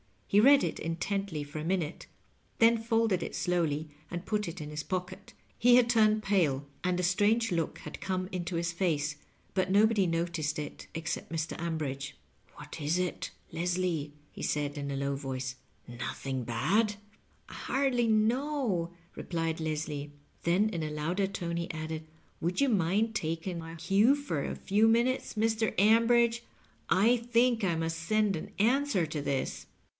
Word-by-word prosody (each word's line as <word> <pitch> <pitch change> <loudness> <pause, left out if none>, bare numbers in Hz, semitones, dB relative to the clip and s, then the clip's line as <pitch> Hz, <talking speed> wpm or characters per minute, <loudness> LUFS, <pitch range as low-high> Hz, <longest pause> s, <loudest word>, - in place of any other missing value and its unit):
He 200 - +4
read 275 +5 +7
it - - -2
intently 170 0 -2
for 145 +2 -7
a - - -4
minute, 170 -2 -2 0.5
then 230 0 +5
folded 225 -4 +1
it - - -4
slowly 160 -4 0 0.2
and 175 +1 -5
put 210 -2 -1
it 170 0 -6
in 150 - -6
his 150 0 -3
pocket. 180 +1 -5 0.3
He 245 +1 +6
had 245 -1 +5
turned 215 -2 +4
pale, 160 -9 +2 0.2
and 180 0 +1
a - - 0
strange 210 +5 +2
look 165 -2 -1
had - - -8
come 185 -1 -2
into 175 -1 -3
his 170 0 0
face, 155 -4 0 0.4
but 185 -1 0
no^ 205 +2 +6
body 210 -4 +2
noticed 165 -2 -1
it 150 -1 -6
except 165 0 -4
Mr. 160 0 -2
Ambridge. 140 -5 -3 0.2
" 95 -1 -33
What 150 +2 -9
is 150 +4 +1
it, 180 -1 -2 0.2
Leslie? 175 -4 -1
" 150 - -34
he - - -10
said 145 -1 -1
in 140 -1 -4
a 140 - -2
low 140 0 -1
voice. 130 -1 -4 0.3
"Notb 120 +1 -6 0.2
ingbad?" 190 - +1 0.5
"I - - -10
hardly 260 -3 +1
know," 220 - +1 0.2
replied 165 -2 -2
Leslie. 150 -2 -3 0.3
Then 185 +6 +3
in 170 -6 -3
a 155 - -2
louder 165 +6 -1
tone 170 -3 -3
he 170 0 -3
added, 155 -1 -5 0.3
"Would 175 - -1
you 280 - +4
mind 210 +2 +2
taking 170 -1 -2
my 165 0 -8
cue 195 - +4
for 280 - -3
a - - -3
few 210 +3 +2
minutes, 240 +3 +2
Mr. 220 0 +1
Ambridge? 230 +3 +4 0.5
I 215 +8 +4
think 235 0 +2
I 170 -3 +1
must 165 0 -2
send 210 +3 +1
an 180 +6 -6
answer 235 - +2
to 155 -1 -4
this." 140 -1 -2
180 Hz, 170 wpm, -30 LUFS, 155-215 Hz, 0.5 s, read